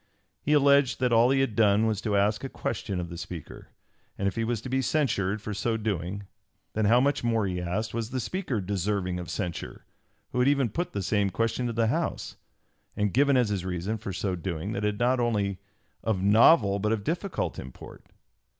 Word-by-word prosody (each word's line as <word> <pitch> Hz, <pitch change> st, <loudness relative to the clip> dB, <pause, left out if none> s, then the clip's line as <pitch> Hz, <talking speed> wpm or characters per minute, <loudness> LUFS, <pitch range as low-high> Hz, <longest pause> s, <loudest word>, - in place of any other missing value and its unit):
He 150 Hz, -, +1 dB
alleged 140 Hz, -2 st, +4 dB
that 125 Hz, -2 st, +2 dB
all 115 Hz, +2 st, +5 dB
he 135 Hz, 0 st, +3 dB
had 130 Hz, -6 st, -1 dB
done 105 Hz, -1 st, +4 dB
was 110 Hz, -2 st, 0 dB
to 105 Hz, -3 st, 0 dB
ask 105 Hz, +4 st, +1 dB
a 135 Hz, -, -4 dB
question 100 Hz, -6 st, -3 dB
of 85 Hz, -1 st, -4 dB
the 85 Hz, -1 st, -7 dB
Speaker, 90 Hz, -3 st, -8 dB, 0.5 s
and 100 Hz, -, 0 dB
if 100 Hz, -, -2 dB
he 115 Hz, -, -1 dB
was 115 Hz, 0 st, -1 dB
to 130 Hz, -, -7 dB
be 130 Hz, +1 st, 0 dB
censured 110 Hz, -8 st, 0 dB
for 105 Hz, -, -4 dB
so 110 Hz, +3 st, -1 dB
doing, 100 Hz, -2 st, -3 dB, 0.5 s
then 110 Hz, 0 st, 0 dB
how 115 Hz, +4 st, +5 dB
much 140 Hz, +1 st, +1 dB
more, 115 Hz, -3 st, +1 dB
he 90 Hz, -2 st, -2 dB
asked, 95 Hz, +6 st, -2 dB
was 115 Hz, -1 st, -3 dB
the 130 Hz, -, -2 dB
Speaker 140 Hz, -, -2 dB
deserving 95 Hz, -1 st, -1 dB
of 90 Hz, -, -7 dB
censure 90 Hz, -5 st, -5 dB, 0.5 s
who 125 Hz, -, -1 dB
had 125 Hz, -, +4 dB
even 140 Hz, -4 st, +3 dB
put 175 Hz, -, -3 dB
the 100 Hz, -, -2 dB
same 100 Hz, +1 st, +1 dB
question 115 Hz, +4 st, -1 dB
to 120 Hz, -, -3 dB
the 115 Hz, 0 st, +1 dB
House, 110 Hz, -, -2 dB, 0.6 s
and 105 Hz, -2 st, 0 dB
given 140 Hz, +1 st, +4 dB
as 120 Hz, -4 st, +2 dB
his 100 Hz, -3 st, -2 dB
reason 95 Hz, +4 st, -3 dB
for 100 Hz, -, -5 dB
so 95 Hz, 0 st, -2 dB
doing 90 Hz, +2 st, -4 dB
that 105 Hz, -2 st, -3 dB
it 105 Hz, 0 st, +1 dB
was -, -, -12 dB
not 125 Hz, +1 st, +2 dB
only 105 Hz, -5 st, 0 dB, 0.4 s
of 110 Hz, -4 st, 0 dB
novel 105 Hz, 0 st, +5 dB
but 105 Hz, +2 st, 0 dB
of 110 Hz, -3 st, -1 dB
difficult 160 Hz, -, -2 dB
import! 65 Hz, 0 st, -11 dB
105 Hz, 215 wpm, -27 LUFS, 100-120 Hz, 0.6 s, all